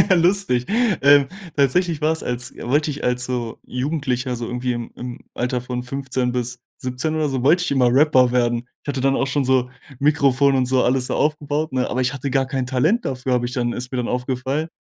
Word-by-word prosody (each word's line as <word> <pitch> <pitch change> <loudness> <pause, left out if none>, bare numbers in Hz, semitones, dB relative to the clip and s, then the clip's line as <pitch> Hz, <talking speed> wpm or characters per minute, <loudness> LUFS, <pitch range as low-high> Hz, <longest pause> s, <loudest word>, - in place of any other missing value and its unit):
lustig. 175 -8 +2
Ähm, 150 - +4 0.3
tatsächlich 155 +3 +2
war 155 +1 +3
es 160 - -7
als 125 +1 -4
wollte 145 +5 0
ich 145 - -7
als 125 0 0
so 120 -3 -4
Jugendlicher 130 -2 -2
so 120 0 -4
irgendwie 125 +1 -2
im 120 -1 -5
im 125 0 -7
Alter 125 +1 -1
von 125 0 -4
15 130 -1 -2
bis 125 0 -3 0.2
17 130 +5 -3
oder 155 -2 0
so, 130 -2 -2
wollte 165 +6 +4
ich - - -2
immer 130 -3 +4
Rapper 130 -3 +5
werden. 120 -1 +1 0.2
Ich - - -21
hatte 140 -2 -2
dann 135 +1 +2
auch 135 - 0
schon 135 0 0
so 130 -1 +2 0.3
Mikrofon 140 -1 +3
und 130 -1 +2
so 130 0 +2
alles 125 0 +1
so - - -2
aufgebaut, 150 +1 0
ne? 130 -1 0
Aber 130 - -1
ich 130 +2 0
hatte 140 0 -4
gar 135 +1 +2
kein 130 -1 -2
Talent 155 - +1
dafür, 130 -1 -2
habe 120 -1 +1
ich 125 - -5
dann 120 -3 -1
ist 125 +1 -6
mir 130 - -3
dann 125 - -1
aufgefallen. 130 +4 -2
130 Hz, 220 wpm, -21 LUFS, 125-145 Hz, 0.3 s, Rapper